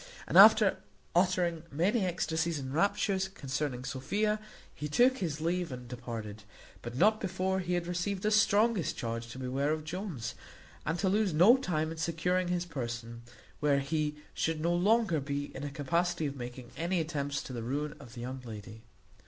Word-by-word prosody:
And - - -3
after - - +8 0.4
uttering 175 -2 +2
many 190 - +1
ecstasies 165 -2 -1
and 135 -1 -5
raptures 195 +2 +1
concerning 135 -6 -3
Sophia, 205 +12 0 0.3
he 150 - -5
took 250 - +4
his 155 -5 -2
leave 175 0 -1
and 125 -1 -7
departed, 115 -4 -6 0.4
but 120 0 -7
not 215 +9 +4
before 190 0 -1
he 180 -1 -1
had 175 -1 -1
received 180 +2 -2
the 215 - +2
strongest 215 - +3
charge 115 0 -3
to 120 - -9
beware 130 +3 -1
of 155 0 -2
Jones, 165 - -4 0.5
and 160 +3 0
to 190 - 0
lose 200 -3 +2
no 190 +10 +8
time 160 -11 -1
in 165 - -7
securing 175 +3 0
his 175 0 -1
person, 120 -6 -5 0.4
where 145 -2 +3
he 150 +1 -1 0.2
should 160 -1 -1
no 170 +2 +1
longer 195 -1 +3
be 140 +1 -4
in 135 - -6
a 145 - -3
capacity 165 +4 0
of 140 -1 -3
making 125 -1 -8
any 175 +2 0
attempts 145 -3 -2
to 130 - -8
the 120 - -4
ruin 145 +6 -2
of 130 -3 -12
the 120 - -7
young 130 +2 -5
lady. 110 -1 -9
160 Hz, 175 wpm, -31 LUFS, 130-185 Hz, 0.5 s, after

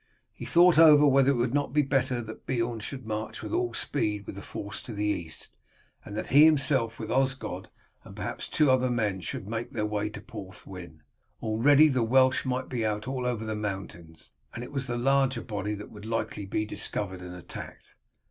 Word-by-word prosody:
He - - -8
thought 175 -1 +5
over 150 -2 +8
whether 135 -1 +5
it 140 - +3
would 120 +1 0
not 145 -2 0
be 150 0 +4
better 130 -3 0
that 110 0 -10
Beorn 120 -2 -1
should 130 +3 -7
march 110 0 -4
with - - -5
all 360 +1 0
speed 105 -7 -2
with - - -7
the 100 - -8
force 100 +1 -7
to 120 - -8
the 105 0 -2
east, 85 -6 -3 0.5
and 105 - -7
that 110 - -2
he 145 +2 +9
himself 135 -7 +3
with 110 - -5
Osgod 130 -8 -1 0.3
and - - -12
perhaps - - -5
two 150 -4 +3
other 130 0 +3
men 105 -6 0
should 95 - -5
make 115 +2 -3
their 110 -3 -1
way 105 0 -1
to 105 - -8
Porthwyn; 95 -7 -10 0.4
already 140 +8 +5
the 130 -4 +1
Welsh 130 +4 +3
might 130 0 -1
be 120 -3 -2
out 110 +1 -2
all 130 -2 -2
over 115 -3 -2
the 110 - -2
mountains, 95 -6 -6 0.2
and 120 - -5
it 125 - -9
was 135 -2 -3
the 120 -1 -2
larger 135 -1 +2
body 105 -2 -3
that 105 - -9
would 105 - -11
be 110 - -9
likely 115 -2 -2
to - - -13
be 105 +2 0
discovered 95 -3 -4
and 90 0 -8
attacked. 90 - -10
115 Hz, 210 wpm, -28 LUFS, 105-130 Hz, 0.5 s, he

